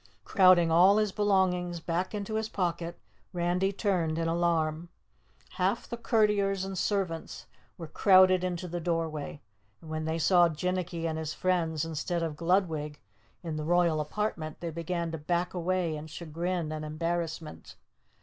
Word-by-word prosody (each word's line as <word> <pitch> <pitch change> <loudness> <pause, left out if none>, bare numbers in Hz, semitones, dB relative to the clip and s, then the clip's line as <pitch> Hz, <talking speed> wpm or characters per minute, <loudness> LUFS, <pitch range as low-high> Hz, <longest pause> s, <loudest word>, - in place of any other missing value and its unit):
Crowding 185 -4 +5
all 185 +5 +6
his 215 -2 +1
belongings 185 -4 +1
back 175 +5 -2
into 205 +1 -4
his 220 0 -1
pocket, 170 -3 -2 0.4
Randy 180 +2 +1
turned 180 -6 0
in 165 0 0
alarm. 165 -1 0 0.7
Half - - 0
the - - -4
courtiers 210 -4 +1
and 195 0 -5
servants 185 -3 -2 0.3
were 170 - -6
crowded 185 +2 +5
into 180 0 -3
the 175 0 -4
doorway. 160 -3 -3 0.4
And 160 - -11
when 155 0 -3
they 160 +1 -1
saw 175 +1 +5
Jinnicky 175 +1 -2
and 160 -1 -2
his 155 -1 -4
friends 165 -4 0
instead 165 +2 -2
of 160 -2 -3
Gludwig 160 -3 0 0.4
in 160 -3 -4
the 155 - -3
Royal 170 -1 +2
Apartment 155 -2 -3
they 170 -1 -4
began 170 +1 -3
to 160 - -5
back 175 +3 -1
away 180 -2 -1
in 150 +1 -7
chagrin 170 +1 -3
and 155 0 -4
embarrassment. 160 0 -4
170 Hz, 150 wpm, -29 LUFS, 160-185 Hz, 0.7 s, all